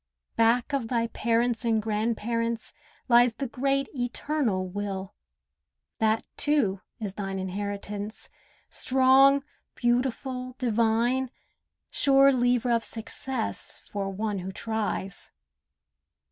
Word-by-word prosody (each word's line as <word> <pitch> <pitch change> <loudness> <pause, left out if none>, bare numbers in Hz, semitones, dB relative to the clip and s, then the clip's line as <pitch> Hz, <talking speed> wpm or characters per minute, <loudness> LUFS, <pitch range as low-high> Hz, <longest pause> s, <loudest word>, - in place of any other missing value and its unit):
Back 235 +5 +3
of 265 -5 0
thy 230 -1 +1
parents 235 0 0
and 225 -2 +2
grandparents 230 +1 -1 0.3
lies 240 -1 +5
The 275 - -3
Great 275 +3 0
Eternal 245 -5 -1
Will. 195 0 -4 0.9
That, 220 0 +2
too, 255 -11 +2 0.2
is 205 -4 -4
thine 195 -1 -4
Inheritance; 205 +2 -4 0.4
strong, 265 +2 +5 0.3
beautiful, 250 +1 -1
divine, 235 +2 +1 0.6
Sure 275 0 +5
lever 245 -1 +2
of 230 -1 +2
success 230 +1 -4
for 200 -1 -2
one 205 +1 -2
who 185 +1 -5
tries. 210 -2 -3
230 Hz, 100 wpm, -27 LUFS, 210-255 Hz, 0.9 s, lies